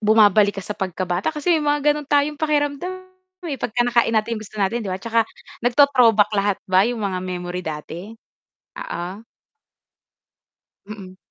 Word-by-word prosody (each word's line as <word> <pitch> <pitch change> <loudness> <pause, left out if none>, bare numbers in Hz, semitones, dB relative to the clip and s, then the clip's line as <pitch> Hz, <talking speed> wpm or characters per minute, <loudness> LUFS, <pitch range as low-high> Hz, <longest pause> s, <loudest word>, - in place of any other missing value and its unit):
bumabalik 210 -2 +4
ka 195 - -6
sa 210 - -4
pagkabata? 185 -1 -2
Kasi 315 +2 0
may - - -3
mga 295 0 +2
gano'n 295 -1 -7
tayong 290 +1 +1
pakiramdam, 295 +1 0 0.6
eh, 285 -6 -4
'pagka 240 +1 0
nakain 235 -2 +2
natin 220 +2 0
'yung - - -6
gusto 210 - -13
natin, 205 +4 0
'di 205 - -5
ba, 185 - -2
'tsaka 230 +2 0 0.3
nagto 245 +4 +5
throwback 225 -5 +4
lahat 200 -1 +1
ba 185 0 +3
'yung 245 - -2
mga 185 -2 -2
memory 180 -1 -4
dati? 170 +7 -7 0.6
Oo. 185 +6 -6 1.6
Mhm. 195 -3 -10
215 Hz, 160 wpm, -21 LUFS, 190-245 Hz, 1.6 s, nagto